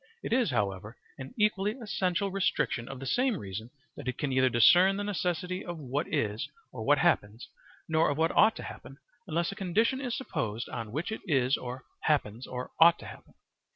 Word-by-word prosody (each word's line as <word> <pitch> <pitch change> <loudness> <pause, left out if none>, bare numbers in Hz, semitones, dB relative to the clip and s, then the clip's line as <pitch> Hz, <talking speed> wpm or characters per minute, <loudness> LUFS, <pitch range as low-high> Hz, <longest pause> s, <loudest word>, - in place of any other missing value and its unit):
It - - -2
is, 245 -5 +3
however, 105 -2 -2 0.2
an 130 - -7
equally 210 -1 +2
essential 195 -3 -1
restriction 185 -10 0
of 135 -1 -7
the 135 - -7
same 250 - +1
reason 105 - -6 0.3
that - - -9
it 130 - -2
can 145 -3 -2
neither 130 0 +3
discern 180 - +6
the 205 - -2
necessity 185 -2 -2
of 175 -1 -6
what 145 -1 -3
is 110 +6 -1 0.2
or 115 -3 -6
what 145 +5 +4
happens, 120 -10 +1 0.4
nor 160 0 +3
of 145 - -1
what 165 +1 +1
ought 220 +1 +6
to - - -7
happen, 135 - -10 0.3
unless 170 +1 0
a - - -7
condition 220 +8 +1
is 245 -3 -2
supposed 120 - -3
on 115 -4 -5
which 155 - -3
it 220 - -4
is 135 -4 +3
or 125 0 -6 0.2
happens 125 -6 0
or 125 0 -6
ought 170 +1 +8
to - - -12
happen. - - -12
155 Hz, 195 wpm, -29 LUFS, 125-190 Hz, 0.4 s, ought